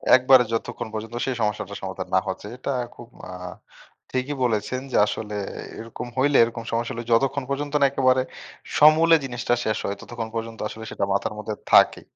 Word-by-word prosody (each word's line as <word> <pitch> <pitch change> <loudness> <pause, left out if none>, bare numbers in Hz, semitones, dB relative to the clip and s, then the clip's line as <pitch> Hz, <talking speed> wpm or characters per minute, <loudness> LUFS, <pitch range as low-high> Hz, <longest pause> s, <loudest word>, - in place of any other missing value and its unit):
একবারে 130 0 +6
যতক্ষণ 115 0 -3
পর্যন্ত 110 +2 -5
সেই 130 -2 -1
সমস্যাটার 105 -1 -2
সমাধান - - -5
না - - +6
হচ্ছে - - -4
এটা 135 +1 -3 0.2
খুব 120 - -11 0.2
আ - - -6 0.8
ঠিকই 130 +3 -1
বলেছেন 120 +2 0
যে - - +2
আসলে 105 0 -4 0.4
এরকম 115 +2 -7
হইলে 140 +2 +4
এরকম 115 0 -3
সমস্যা 115 0 -1
হলে 120 - -5
যতক্ষণ 135 +3 +2
পর্যন্ত 145 +1 -3
না - - +7
একেবারে 130 -1 +3 0.6
সমূলে 160 +2 +7
জিনিসটা 120 -2 -1
শেষ 110 -1 0
হয়, 100 - -2
ততক্ষণ 115 -2 -6
পর্যন্ত 115 0 -4
আসলে 110 - -9
সেইটা - - -1
মাথার 100 +2 -1
মধ্যে 105 0 -4 0.2
থাকে। - - +6
120 Hz, 175 wpm, -24 LUFS, 110-135 Hz, 0.8 s, না